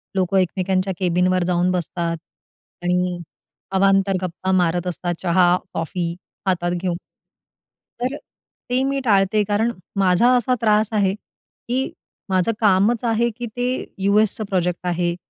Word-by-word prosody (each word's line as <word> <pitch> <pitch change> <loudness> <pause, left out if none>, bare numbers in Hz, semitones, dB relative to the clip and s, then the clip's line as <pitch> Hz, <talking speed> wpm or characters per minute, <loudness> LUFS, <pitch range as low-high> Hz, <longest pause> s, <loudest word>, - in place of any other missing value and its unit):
लोक 190 0 0
एकमेकांच्या 185 +1 0
कॅबिनवर 180 0 +2
जाऊन 180 0 +2
बसतात 170 -1 -2 0.7
आणि 180 0 0 0.6
अवांतर 195 0 +3
गप्पा 185 +1 -3
मारत 180 -1 +1
असतात, 175 0 -2
चहा-कॉफी 175 -1 +1 0.3
हातात 175 -2 0
घेऊन. 180 -2 -1 1.0
तर 255 +3 -1 0.5
ते 250 +1 +1
मी 275 0 0
टाळते. 205 -1 +3
कारण 210 +3 +1 0.3
माझा 190 +5 +4
असा 250 +1 +2
त्रास 215 -1 +3
आहे, 200 -3 +2 0.5
की 255 +2 -1 0.4
माझं 185 +3 +2
कामच 210 +3 +3
आहे, 235 0 +2
की 240 +2 -6
ते 245 +2 -3 0.4
यूएसचं 210 +2 +3
प्रोजेक्ट 180 -2 -1
आहे 175 0 0
190 Hz, 120 wpm, -21 LUFS, 180-215 Hz, 1.0 s, माझा